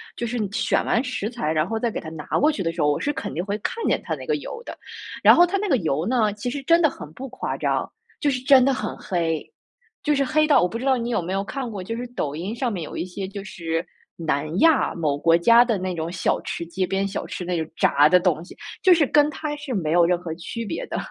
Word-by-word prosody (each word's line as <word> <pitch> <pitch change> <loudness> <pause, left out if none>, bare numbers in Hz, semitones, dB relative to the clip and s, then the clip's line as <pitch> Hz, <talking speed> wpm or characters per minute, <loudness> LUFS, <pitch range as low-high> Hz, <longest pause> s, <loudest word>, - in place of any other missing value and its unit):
就 235 - -3
是 245 +2 -3
选 - - +1
完 235 - +2
食 250 -5 -3
材， 230 -10 -2
然 155 +1 +1
后 225 +2 -2
再 235 - 0
给 - - -4
它 160 - -8
拿 155 -2 -8
过 300 +2 +4
去 250 - -4
的 165 - 0
时 170 - -3
候， 150 0 +3
我 145 - -1
是 290 - -1
肯 205 - -5
定 175 - -2
会 205 +1 -2
看 460 - -4
见 - - +1
它 - - -2
那 - - -9
个 - - +1
油 465 - -7
的。 - - -8 0.5
然 - - +9
后 350 - +7
它 370 +3 -1
那 405 0 -2
个 270 - +4
油 160 - -1
呢， 225 -4 +2
其 210 +4 -4
实 280 +3 -4
真 335 +4 +4
的 315 - +5
很 150 - -10
不 265 +10 -7
夸 260 - -4
张， - - -1 0.3
就 295 - +1
是 260 -2 0
真 260 -1 +6
的 275 - +3
很 215 -4 -4
黑。 165 -4 -2 0.5
就 300 -1 +2
是 275 - +2
黑 305 +3 +2
到 295 - +5
我 180 - +3
不 230 - -5
知 255 - -5
道 270 -1 +4
你 235 -1 -3
有 230 -5 0
没 175 +2 -4
有 195 +1 0
看 250 +5 -5
过， 200 -4 -6
就 225 +5 -4
是 245 +1 -5
抖 145 - -2
音 185 +8 -4
上 240 0 -1
面 190 -5 -4
有 - - -8
一 - - -2
些 190 +1 -6
就 200 0 -7
是 165 -3 -3 0.3
南 155 0 -2
亚 325 -3 +4
某 150 -4 0
国 165 +3 +4
家 235 +7 +6
的 230 -4 0
那 185 0 -3
种 165 -1 -3
小 180 0 0
吃， 170 - -4
街 185 +2 -2
边 195 +1 0
小 195 0 -4
吃。 - - -5
那 180 0 -2
种 160 - -5
炸 145 +1 +4
的 180 - +6
东 175 -3 +1
西， - - -13 0.3
就 370 - +7
是 325 -3 +4
跟 295 +2 +4
它 305 0 -4
是 290 -3 -5
没 165 -8 -1
有 170 +1 +5
任 175 +1 +2
何 170 -2 -6
区 230 +7 -6
别 - - -4
的。 - - -4
205 Hz, 305 characters per minute, -23 LUFS, 170-260 Hz, 0.5 s, 然